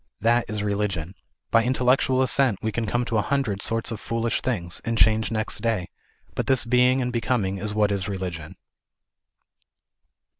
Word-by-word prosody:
That 120 +2 +2
is 105 -1 -3
religion. 100 -5 -2 0.4
By 115 - +4
intellectual 130 +1 +2
assent 130 -4 +2
we 110 - 0
can 115 +1 -2
come 120 +2 0
to 115 -2 0
a - - +3
hundred 120 -7 -1
sorts 115 +1 -1
of 110 - -4
foolish 115 +1 -1
things, 85 -9 -2
and 115 -2 -2
change 110 0 +3
next 110 -1 -2
day, 110 -6 -1 0.4
but - - -3
this 130 -3 +3
being 125 +2 +3
and 125 0 -3
becoming 110 -5 -1
is 105 +1 -3
what 105 -1 +2
is 100 0 -2
religion. 90 -3 -5
110 Hz, 165 wpm, -24 LUFS, 100-125 Hz, 0.4 s, By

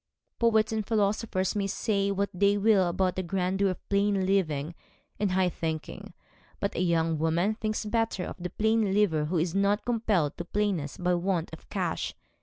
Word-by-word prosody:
Poets 220 -2 +3
and 220 -1 -1
philosophers 205 -2 0
may 200 -1 0
say 200 0 0
what 200 0 -1
they 200 +2 +3
will 200 -3 +4
about 185 +1 0
the 185 - -1
grandeur 190 +2 0
of 185 - -6
plain 200 -1 +2
living 165 -5 0 0.5
and 200 -3 +1
high 185 0 +3
thinking; 160 -3 -5 0.4
but - - -1
a - - -3
young 165 -3 +1
woman 170 +6 +1
thinks 215 0 -3
better 225 -3 0
of - - -6
the 180 - -3
plain 220 -2 +1
liver 165 -8 +2
who 175 +4 -1
is 165 +1 0
not 200 +2 +1
compelled 215 -10 +1
to - - -4
plainness 190 -7 -1
by 180 0 +1
want 175 -2 -1
of 160 - -12
cash. - - -2
195 Hz, 180 wpm, -28 LUFS, 175-210 Hz, 0.5 s, will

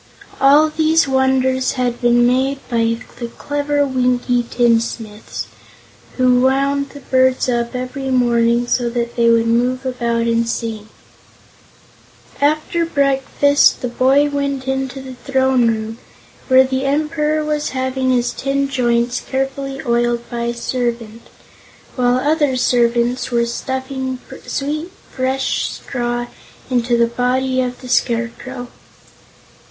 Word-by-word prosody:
All 295 +3 +5
these 315 0 +2
wonders 260 -1 +1
had 250 -1 -2
been 240 0 +4
made 260 +3 +1
by 230 -1 +1 0.2
the 235 - -3
clever 290 0 0
Winkie 250 -2 +1
tinsmiths, 230 -2 -1 0.7
who 250 -1 +4
wound 275 +2 +1
the 285 - -12
birds 260 -1 +2
up 240 0 -1
every 260 +2 -4
morning 240 -1 +2
so 240 0 0
that 235 0 -3
they 235 -1 +3
would 230 0 +4
move 250 +3 +1
about 235 -2 -1
and 230 0 +1
sing. 220 -2 -4 1.5
After 310 +3 +1
breakfast 285 -2 +2
the 250 - -1
boy 265 +4 +3
went 280 -2 -2
into 265 0 -3
the 260 -1 -8
throne 260 -1 +1
room, 220 0 -2 0.5
where 260 0 +6
the 265 0 -2
Emperor 305 +1 0
was 300 -1 -1
having 260 0 -1
his 245 -1 +1
tin 275 0 -1
joints 240 -2 +1
carefully 270 0 -3
oiled 235 0 0
by 235 0 -2
a 235 - -1
servant, 235 -2 -4 0.7
while 245 -1 +2
other 290 0 +1
servants 240 0 +1
were 235 -1 +1
stuffing 260 +2 -4 0.3
sweet, 305 +5 -3 0.2
fresh 260 +1 -1
straw 240 -1 -3 0.5
into 240 -1 +1
the 235 - +4
body 255 +2 0
of 250 -1 -4
the 255 - -9
Scarecrow. 245 +1 -1
255 Hz, 125 wpm, -18 LUFS, 240-270 Hz, 1.5 s, where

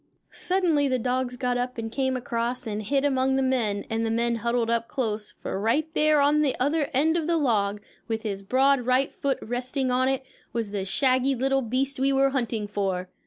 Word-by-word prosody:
Suddenly 345 -6 +1
the 260 -1 +1
dogs 250 +1 -1
got 250 0 0
up 250 0 -3
and 225 -1 -4
came 260 0 0
across 240 0 -3
and 215 -1 -3
hid 275 +6 0
among 265 -1 +2
the 270 - +1
men, 230 -6 0
and 225 0 -1
the 225 - 0
men 235 +1 0
huddled 235 0 0
up 230 0 0
close; 215 -5 -3
for - - -3
right 260 +9 +1
there 305 -1 +3
on 290 +2 +4
the 285 -3 +1
other 290 +3 +1
end 305 +5 +2
of 325 -2 -1
the 340 -1 +2
log, 210 -8 +1 0.3
with 225 -1 -3
his 200 -3 -3
broad 265 +6 +3
right 255 +2 +2
foot 275 -2 -1
resting 255 +2 -2
on 255 +1 +2
it, 270 0 -1 0.3
was 225 -3 -2
the 200 -2 -3
shaggy 260 +5 +2
little 270 +2 +1
beast 260 +3 -1
we 270 +1 +2
were 270 0 +3
hunting 230 -5 -2
for. 190 -3 -2
255 Hz, 210 wpm, -26 LUFS, 225-275 Hz, 0.3 s, on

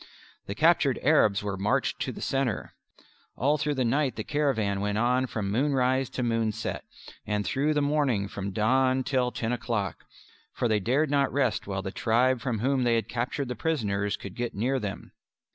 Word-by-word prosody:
The - - -4
captured - - +3
Arabs 105 -1 +4
were 100 -2 -3
marched 100 +3 0
in - - -4
the - - -8
centre. 135 -6 -1 0.6
All 145 +4 +1
through 145 0 0
the 130 -2 +1
night 135 +3 +1
the - - -4
caravan 110 -10 0
went 105 0 -1
on 125 +3 +2
from 105 -4 -3
moonrise 130 +1 +1
to 125 - -1
moonset, 115 -2 -1 0.4
and 105 -1 -1
through 145 +9 0
the 145 - +2
morning 140 -9 +1
from 100 0 -5
dawn 130 +6 +2
till 125 -2 0
ten 115 -1 -2
o'clock 115 -5 -3 0.5
for 120 - 0
they 110 -2 +2
dared 135 +8 +1
not 140 -1 +2
rest 130 -8 0
while 95 -1 -3
the 95 - -4
tribe 120 +3 +2
from 115 -3 -2
whom 130 +1 +1
they 120 -1 +3
had 115 - -1
captured 125 +3 -2
the 125 - -4
prisoners 105 -8 -1
could 100 - -8
get 120 +2 -4
near 130 +6 0
them. 100 -4 -6
120 Hz, 185 wpm, -27 LUFS, 105-135 Hz, 0.6 s, Arabs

